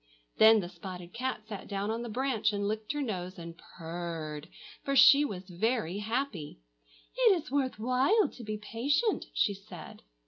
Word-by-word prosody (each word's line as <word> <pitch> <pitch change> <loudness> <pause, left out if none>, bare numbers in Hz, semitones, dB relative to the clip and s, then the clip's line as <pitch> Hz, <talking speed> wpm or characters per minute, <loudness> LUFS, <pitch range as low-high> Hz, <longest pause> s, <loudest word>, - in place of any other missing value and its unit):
Then 220 0 +8
the 175 - -5
spotted 180 0 -9
cat 255 0 -3
sat 210 -3 -7
down 200 +1 -2
on 230 +1 -3
the 240 - -5
branch, 225 -2 0
and 200 -1 -2
licked 215 0 -2
her 295 -1 -2
nose 185 -6 -4
and 170 -1 -8
purred, 165 -3 -6 0.3
for 275 - -1
she 280 +2 +8
was 195 -10 -4
very 200 0 -1
happy. 220 - -3 0.6
"It 460 -7 +5
is 300 - -12
worth 270 -2 0
while 255 - +3
to 245 - -11
be 215 -1 -4
patient!" 275 - 0
she 205 - +2
said. 195 0 -11
215 Hz, 170 wpm, -30 LUFS, 185-260 Hz, 0.6 s, Then